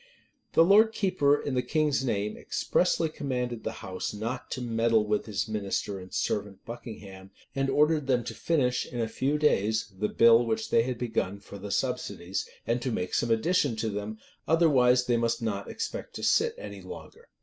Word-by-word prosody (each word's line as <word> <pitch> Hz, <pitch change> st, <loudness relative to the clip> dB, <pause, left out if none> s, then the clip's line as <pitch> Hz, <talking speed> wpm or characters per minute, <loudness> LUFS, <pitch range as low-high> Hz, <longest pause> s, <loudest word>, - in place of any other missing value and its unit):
[] -, -, -45 dB
The 165 Hz, -, +6 dB
lord 215 Hz, +4 st, +6 dB
keeper, 180 Hz, -9 st, +2 dB
in 140 Hz, -, -3 dB
the 125 Hz, -, +2 dB
king's 150 Hz, -1 st, +1 dB
name, 105 Hz, -4 st, -1 dB
expressly 175 Hz, -2 st, 0 dB
commanded 125 Hz, -6 st, -3 dB
the -, -, -2 dB
house 95 Hz, +3 st, -4 dB
not 115 Hz, +4 st, -4 dB
to -, -, -4 dB
meddle 115 Hz, -2 st, +2 dB
with 105 Hz, +1 st, -1 dB
his 105 Hz, +2 st, -2 dB
minister 100 Hz, -2 st, -2 dB
and 90 Hz, 0 st, -11 dB
servant, 100 Hz, -1 st, -2 dB
Buckingham; 100 Hz, -5 st, -9 dB, 0.2 s
and 135 Hz, -1 st, 0 dB
ordered 150 Hz, 0 st, +2 dB
them 125 Hz, -3 st, +2 dB
to -, -, -5 dB
finish, 130 Hz, -7 st, 0 dB
in 120 Hz, -, -6 dB
a 115 Hz, -, 0 dB
few 135 Hz, +6 st, 0 dB
days, 110 Hz, -7 st, +1 dB
the 105 Hz, +3 st, -1 dB
bill 115 Hz, 0 st, +6 dB
which 110 Hz, -1 st, -2 dB
they 115 Hz, -, +5 dB
had 125 Hz, +1 st, -2 dB
begun 110 Hz, -5 st, -2 dB
for 100 Hz, 0 st, -11 dB
the 100 Hz, +1 st, -7 dB
subsidies, 100 Hz, -7 st, -2 dB, 0.2 s
and 120 Hz, +2 st, 0 dB
to 130 Hz, -, -2 dB
make 90 Hz, -4 st, -3 dB
some 120 Hz, -, +1 dB
addition 135 Hz, +3 st, +2 dB
to 110 Hz, 0 st, -2 dB
them; 105 Hz, +1 st, -4 dB, 0.3 s
otherwise 130 Hz, -7 st, +4 dB
they 120 Hz, -1 st, +2 dB
must 115 Hz, 0 st, 0 dB
not 105 Hz, -4 st, -3 dB
expect 225 Hz, -, -5 dB
to -, -, -6 dB
sit 460 Hz, +1 st, +3 dB
any -, -, -8 dB
longer. 470 Hz, +1 st, -11 dB
120 Hz, 190 wpm, -28 LUFS, 105-140 Hz, 0.3 s, The